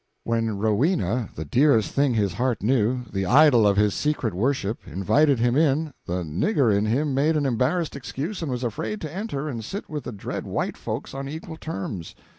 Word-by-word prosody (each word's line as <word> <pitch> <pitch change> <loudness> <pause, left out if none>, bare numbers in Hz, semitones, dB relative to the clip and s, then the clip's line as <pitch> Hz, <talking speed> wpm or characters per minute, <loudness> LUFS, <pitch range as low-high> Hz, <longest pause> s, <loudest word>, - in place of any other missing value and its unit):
When 115 -2 -1
Rowena, 110 - +1
the 80 - -5
dearest 125 - +3
thing 140 -3 +2
his 100 -4 +1
heart 120 0 -1
knew, 125 +1 +2
the 95 -1 -1
idol 125 -2 +6
of 100 -1 +2
his 105 -1 +3
secret 145 -8 -1
worship, 110 +1 -1
invited 140 - +2
him 120 +1 +2
in, 150 0 +2
the 90 +1 -2
"nigger" 105 - +1
in 105 +2 +1
him 140 +6 +1
made 150 +4 +2
an 145 - 0
embarrassed 135 +7 0
excuse 140 +8 -5
and 160 - -3
was 125 0 -3
afraid 120 - -3
to 155 -2 -6
enter 185 -8 -3
and 120 -6 -4
sit 200 - -6
with 150 -2 -4
the - - -4
dread 105 - -5
white - - -2
folks - - -5
on 135 0 -5
equal 160 +2 -7
terms. 95 - -6
125 Hz, 195 wpm, -24 LUFS, 105-150 Hz, -, idol